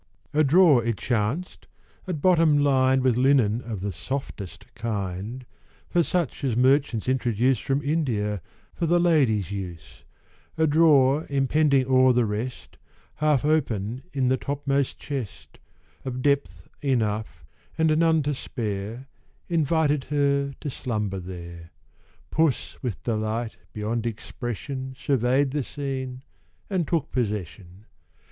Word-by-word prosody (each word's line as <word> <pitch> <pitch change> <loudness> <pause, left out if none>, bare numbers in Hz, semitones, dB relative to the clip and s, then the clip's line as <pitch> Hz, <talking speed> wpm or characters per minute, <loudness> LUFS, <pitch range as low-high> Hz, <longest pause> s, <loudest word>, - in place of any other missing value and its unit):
A 155 +1 +4
drawer, 150 -4 +5
it 115 -2 -1
chanced, 120 - -2 0.4
at 160 -6 -4
bottom 165 -5 +5
lined 130 -2 +3
With 125 -3 +3
linen 125 -4 +3
of 115 -6 -6
the 100 +1 -2
softest 100 +1 -6
kind, 110 +2 -4 0.5
With 170 -2 +3
such 175 -9 -1
as 130 -5 0
merchants 130 -3 +2
introduce 125 0 +2
From 140 +2 -1
India, 115 - 0 0.3
for 170 - -2
the 175 +2 +4
ladies' 130 - +2
use, 90 -5 -7 0.5
A 160 - +3
drawer 150 -2 +4
impending 140 0 +2
o'er 130 0 +5
the 120 -1 +3
rest, 110 +4 -5 0.4
Half 150 -3 +2
open 125 -7 0
in 130 -2 0
the 130 - +2
topmost 140 -1 -1
chest, 135 -8 -7 0.4
Of 130 -1 -4
depth 140 -1 0
enough, 110 - -1 0.3
and 160 -1 +3
none 160 -2 +3
to 145 +1 0
spare, 110 -1 -4 0.4
Invited 155 -3 +1
her 140 -1 +1
to 145 - -3
slumber 105 -7 -3
there; 85 -2 -9 0.6
Puss 160 -4 +1
with 120 -8 -4
delight 110 0 -2
beyond 110 +2 -2
expression, 120 +4 -5
Survey'd 135 0 +1
the 145 +1 -1
scene, 130 -1 -5 0.5
and 180 -5 0
took 165 -5 -1
possession. 100 -4 -4
130 Hz, 125 wpm, -25 LUFS, 110-145 Hz, 0.6 s, drawer